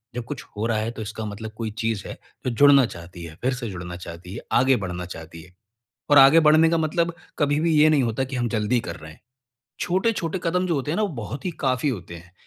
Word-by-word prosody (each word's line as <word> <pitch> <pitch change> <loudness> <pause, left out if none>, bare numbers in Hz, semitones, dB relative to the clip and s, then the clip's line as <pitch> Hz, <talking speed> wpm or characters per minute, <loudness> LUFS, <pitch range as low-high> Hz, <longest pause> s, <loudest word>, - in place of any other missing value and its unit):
जब 120 - -3
कुछ 145 +3 -6
हो 105 - -1
रहा 115 -2 0
है, 110 +2 -2
तो 115 - -8
इसका 110 +1 -5
मतलब 105 +1 -6
कोई 110 -2 -3
चीज़ 110 -3 -2
है, - - -7 0.3
जो 130 - +1
जुड़ना 140 +1 +6
चाहती 85 -2 -10
है, 80 -1 -9
फिर 130 +2 +1
से 125 -3 -5
जुड़ना 90 -2 -7
चाहती 85 +1 -9
है, - - -5
आगे 130 +2 +4
बढ़ना 90 0 -5
चाहती 80 -1 -9
है। 90 +2 -18 0.6
और 145 - +6
आगे 140 +4 +8
बढ़ने 160 +1 +5
का 165 - +2
मतलब 165 +2 0 0.3
कभी 145 0 +2
भी 165 0 +2
ये 155 - +7
नहीं 150 -4 +3
होता 115 +2 -1
कि 130 0 -5
हम 120 -1 0
जल्दी 115 +2 +1
कर 85 - -5
रहे 80 0 -11
हैं। - - -18 0.6
छोटे-छोटे 190 -1 0
कदम 180 +2 0
जो 170 - 0
होते 140 +1 -2
हैं 165 - -1
ना, 215 - +1
वो 210 - +1
बहुत 120 - -6
ही 185 - -1
काफ़ी 130 +2 +1
होते 90 -9 -5
हैं। 85 +1 -15
120 Hz, 250 wpm, -24 LUFS, 95-150 Hz, 0.6 s, आगे